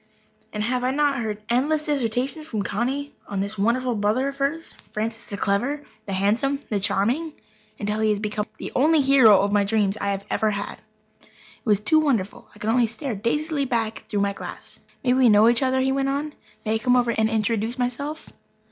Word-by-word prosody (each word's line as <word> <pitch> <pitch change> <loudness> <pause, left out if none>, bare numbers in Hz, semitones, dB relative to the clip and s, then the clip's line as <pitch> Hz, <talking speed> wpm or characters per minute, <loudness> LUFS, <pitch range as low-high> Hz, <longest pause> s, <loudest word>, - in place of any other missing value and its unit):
And 210 - -3
have 250 +2 -1
I 255 - +2
not 280 -1 +1
heard 215 -2 -4
endless 295 +6 +1
dissertations 270 +2 -1
from 215 -8 -2
Connie 260 +9 -2
on 200 - -3
this 200 +2 -3
wonderful 240 +5 +1
brother 220 +6 +1
of 275 - -9
hers, 295 +4 -2 0.2
Francis 225 +2 -4
the 200 - -5
clever, 245 +10 0 0.2
the 195 - -3
handsome, 225 +9 +1
the 210 - 0
charming, 245 +12 0 0.4
until 210 +1 -2
he 220 0 +2
has 210 -1 +1
become 210 0 -3
the - - -6
only 305 +3 +4
hero 265 -7 +6
of 200 +1 +1
dreams 205 -2 +1
I 200 - 0
have 200 0 -3
ever 220 - +2
had? 200 -1 -4 0.4
It - - -23 0.4
was 210 -3 +3
too 315 +9 +4
wonderful. 235 -11 -1
I - - -14
could 210 +1 -1
only 240 0 +3
stare 230 +4 -4
dazedly 285 +8 -1
back 225 -3 -2
through 205 -2 0
my 200 0 +1
glass. - - -9 0.2
"May 250 -1 +3
we 255 -2 +5
know 210 +1 +6
each 235 +2 +4
other?" 260 0 +2
he 265 0 +1
went 270 0 0
on. 290 +2 -2 0.3
"May 215 - +1
I - - +2
come 250 +3 +3
over 240 -1 +3
and 220 -1 +1
introduce 225 +2 -1
myself? 280 +5 -3
235 Hz, 200 wpm, -24 LUFS, 210-275 Hz, 0.4 s, hero